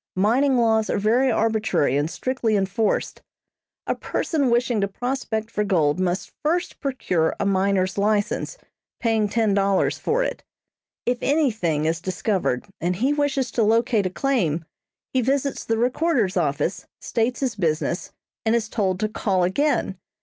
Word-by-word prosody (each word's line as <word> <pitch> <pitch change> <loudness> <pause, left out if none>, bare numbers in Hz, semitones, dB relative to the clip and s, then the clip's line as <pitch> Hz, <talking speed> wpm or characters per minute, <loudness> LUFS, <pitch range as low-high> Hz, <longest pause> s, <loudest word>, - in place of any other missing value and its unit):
Mining 250 +8 +3
laws 220 -2 +2
are - - +1
very 235 +6 +3
arbitrary 220 - +1
and 145 +2 +1
strictly 245 0 -1
enforced. 200 +2 0 0.6
A - - 0
person 285 -6 -1
wishing 235 -2 +1
to 200 - +1
prospect 230 0 -3
for 210 - 0
gold 170 -6 +1
must 185 0 -1
first 340 +4 -1
procure 185 - 0
a - - 0
miner's 190 -1 +1
license, 210 - 0 0.4
paying 220 -3 +1
ten 220 -2 +1
dollars 195 -1 +1
for - - +1
it. - - -4 0.6
If 245 0 0
anything 220 - +1
is 165 0 0
discovered, 185 - -1 0.2
and 180 +1 0
he 260 +10 +1
wishes 285 -3 0
to 235 - 0
locate 225 -1 +2
a - - -3
claim, 180 - 0 0.5
he 260 - +3
visits 275 +2 0
the 225 - 0
recorder's 245 - +1
office, 165 +2 -1
states 240 +3 -1
his 255 -4 -1
business, 170 -1 -1 0.3
and 225 +1 +2
is 225 -2 -1
told 190 -5 0
to 215 - +2
call 195 -3 0
again. 190 -1 0
220 Hz, 150 wpm, -23 LUFS, 185-250 Hz, 0.6 s, Mining